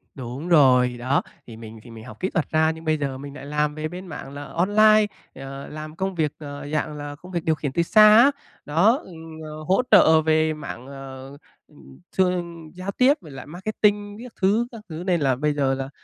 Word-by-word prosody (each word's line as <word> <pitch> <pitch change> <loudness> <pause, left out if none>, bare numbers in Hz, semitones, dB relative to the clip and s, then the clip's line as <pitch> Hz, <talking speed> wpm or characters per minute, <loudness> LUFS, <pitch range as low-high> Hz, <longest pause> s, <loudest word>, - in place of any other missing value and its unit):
Đúng 130 +6 -6
rồi, 125 -6 +5
đó, 130 +3 +1 0.3
thì 115 -2 -10
mình 110 0 -10
thì 120 - -14
mình 110 -1 -11
học 110 - -12
kỹ 190 - -1
thuật 165 -7 -2
ra 160 0 +3
nhưng 160 0 -10
bây 155 0 +1
giờ 140 -3 -3
mình 140 +1 -9
lại 135 - -9
làm 150 0 -1
về 155 0 -3
bên 180 +3 -9
mảng 145 -4 -8
là 145 0 -7
online, 215 +6 +4 0.3
ờ, 135 +1 -8
làm 155 0 -8
công 190 +2 -3
việc, 155 -3 0
ờ, 145 -1 -8
dạng 155 0 -1
là 145 0 -6
công 180 +5 -14
việc 170 -3 -2
điều 160 - +1
khiển 145 -2 -4
từ 170 +5 +1
xa 215 +4 +7
á, 260 +5 +7 0.3
đó, 180 - +3
ừ, - - -13 0.3
ờ, 155 0 -8
hỗ 190 +8 +2
trợ 160 0 +7
về 155 0 +2
mảng, 130 -4 -8
ờ, 135 0 -10 0.8
thường 175 -3 -1
giao 185 +2 -5
tiếp 255 +7 +4
với 155 -5 -12
lại 135 -2 -9
marketing 205 +4 -1
các 250 - -11
thứ 215 +5 +2
các 230 -3 -10
thứ, 160 +1 -6
nên 175 -4 +1
là 135 -2 +2
bây 150 +3 0
giờ 140 -2 +1
là, 135 0 -4
155 Hz, 220 wpm, -23 LUFS, 140-185 Hz, 0.8 s, xa